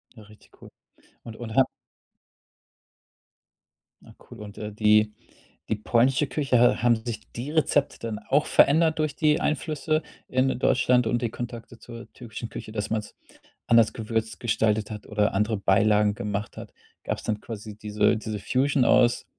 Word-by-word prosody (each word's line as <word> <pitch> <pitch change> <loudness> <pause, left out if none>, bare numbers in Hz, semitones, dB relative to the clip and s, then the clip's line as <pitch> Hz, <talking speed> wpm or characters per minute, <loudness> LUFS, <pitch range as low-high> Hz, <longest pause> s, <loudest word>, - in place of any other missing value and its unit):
Ja 110 - -13
richtig 105 +1 -20
cool. - - -12 0.5
Und 115 -2 -10
und 115 -2 -7
ha 135 - +6 2.4
Na - - -17
cool 120 - -12
und, 105 -1 -10
äh, 105 0 -6
die 105 0 +3 0.6
die 110 - +1
polnische 125 +6 +2
Küche, 135 -4 0
ha 120 -1 +4
haben 120 0 +4
sich 115 -1 -6
die 125 +5 -5
Rezepte 150 -2 +1
dann 115 -2 -4
auch 145 +3 +2
verändert 160 +3 +4
durch 155 -2 -1
die 150 -1 +2
Einflüsse 155 +1 -1 0.3
in 130 0 +1
Deutschland 125 0 +2
und 120 +2 0
die 120 - -1
Kontakte 120 0 -8
zur 115 +1 -11
türkischen 115 -1 -8
Küche, - - -8
dass 105 -2 -4
man's 110 -2 -4 0.5
anders 115 -2 +4
gewürzt 110 0 -3
gestaltet 110 -2 0
hat 105 -1 -8
oder 105 -1 0
andere 105 +2 0
Beilagen 105 +1 +3
gemacht 105 0 -4
hat? - - -9 0.3
Gab's - - -4
dann 105 -1 -2
quasi 105 -2 -8
diese 105 +2 +1
diese 110 -1 -5
Fusion 130 +5 +1
aus, 120 -1 +3
115 Hz, 160 wpm, -25 LUFS, 105-125 Hz, 2.4 s, ha